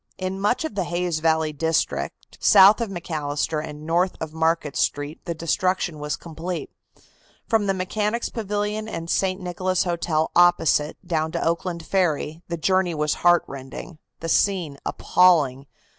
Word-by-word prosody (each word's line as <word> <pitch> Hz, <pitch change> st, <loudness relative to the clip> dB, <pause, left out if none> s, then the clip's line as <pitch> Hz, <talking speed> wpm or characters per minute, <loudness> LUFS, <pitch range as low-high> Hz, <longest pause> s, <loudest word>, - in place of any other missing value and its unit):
In 185 Hz, +1 st, -3 dB
much 245 Hz, +9 st, +1 dB
of 315 Hz, -, -4 dB
the 195 Hz, -3 st, -1 dB
Hayes 175 Hz, -2 st, -1 dB
Valley 160 Hz, -1 st, +1 dB
district, 160 Hz, +2 st, -2 dB
south 200 Hz, +3 st, +7 dB
of 230 Hz, -, -1 dB
McAllister 155 Hz, -3 st, -2 dB
and 150 Hz, -1 st, -8 dB
north 175 Hz, +3 st, +1 dB
of 160 Hz, -1 st, -5 dB
Market 160 Hz, -2 st, 0 dB
Street, 145 Hz, +2 st, -1 dB
the 170 Hz, -2 st, -3 dB
destruction 170 Hz, 0 st, -1 dB
was 150 Hz, 0 st, -2 dB
complete. 170 Hz, +2 st, -6 dB, 0.8 s
From 220 Hz, -3 st, +2 dB
the 195 Hz, -, +2 dB
Mechanics' 210 Hz, +5 st, -1 dB
Pavilion 210 Hz, 0 st, -3 dB
and 165 Hz, -5 st, -5 dB
St. 190 Hz, -1 st, +1 dB
Nicholas 185 Hz, 0 st, -1 dB
Hotel 170 Hz, -3 st, -1 dB
opposite 175 Hz, -3 st, +3 dB
down 160 Hz, -2 st, -1 dB
to -, -, -1 dB
Oakland 170 Hz, 0 st, -2 dB
Ferry 160 Hz, -4 st, 0 dB
the 170 Hz, -, -3 dB
journey 185 Hz, +1 st, +1 dB
was 150 Hz, 0 st, 0 dB
heartrending, 155 Hz, -2 st, 0 dB, 0.2 s
the 165 Hz, -, -3 dB
scene 170 Hz, -7 st, +1 dB
appalling. 150 Hz, -7 st, +3 dB
170 Hz, 145 wpm, -23 LUFS, 155-185 Hz, 0.8 s, south